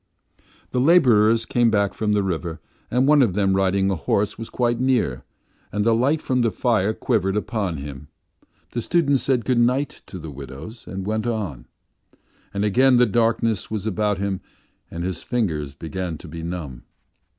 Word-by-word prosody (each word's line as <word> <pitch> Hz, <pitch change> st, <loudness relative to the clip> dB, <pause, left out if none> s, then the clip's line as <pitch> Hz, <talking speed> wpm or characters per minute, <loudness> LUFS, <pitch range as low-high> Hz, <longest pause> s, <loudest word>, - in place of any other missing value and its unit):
The 125 Hz, -, +1 dB
labourers 115 Hz, -8 st, +5 dB
came 120 Hz, 0 st, +2 dB
back 100 Hz, -2 st, +1 dB
from 105 Hz, -1 st, 0 dB
the 105 Hz, -1 st, +2 dB
river, 85 Hz, -3 st, -3 dB, 0.3 s
and 125 Hz, +2 st, +2 dB
one 150 Hz, -1 st, +6 dB
of 110 Hz, -8 st, +2 dB
them 95 Hz, -2 st, +2 dB
riding 95 Hz, 0 st, +2 dB
a -, -, 0 dB
horse 100 Hz, +5 st, 0 dB
was 115 Hz, -, -7 dB
quite 120 Hz, -1 st, 0 dB
near, 125 Hz, -, +1 dB, 0.5 s
and 105 Hz, 0 st, -1 dB
the 115 Hz, -, +4 dB
light 135 Hz, +7 st, +1 dB
from 130 Hz, -1 st, +1 dB
the 115 Hz, -, +3 dB
fire 110 Hz, 0 st, +1 dB
quivered 105 Hz, -4 st, 0 dB
upon 105 Hz, -6 st, -2 dB
him. 70 Hz, 0 st, -8 dB, 0.6 s
The 120 Hz, -, -2 dB
student 145 Hz, -2 st, +2 dB
said 125 Hz, -3 st, +1 dB
good 125 Hz, -2 st, +2 dB
night 125 Hz, +4 st, +1 dB
to 95 Hz, -, -8 dB
the 80 Hz, -3 st, -8 dB
widows 70 Hz, -, -10 dB
and 95 Hz, 0 st, -5 dB
went 110 Hz, +2 st, -1 dB
on. 100 Hz, -, -3 dB, 0.8 s
And 100 Hz, +1 st, -1 dB
again 125 Hz, +5 st, +4 dB
the 125 Hz, -, +6 dB
darkness 115 Hz, -2 st, +1 dB
was 110 Hz, -2 st, -3 dB
about 105 Hz, -1 st, 0 dB
him 95 Hz, -1 st, -2 dB, 0.5 s
and 85 Hz, +1 st, -5 dB
his 90 Hz, -2 st, -3 dB
fingers 80 Hz, -, -2 dB
began 85 Hz, +1 st, -4 dB
to 85 Hz, -, -12 dB
be 80 Hz, +2 st, -7 dB
numb. 80 Hz, -8 st, -5 dB
105 Hz, 175 wpm, -23 LUFS, 90-120 Hz, 0.8 s, one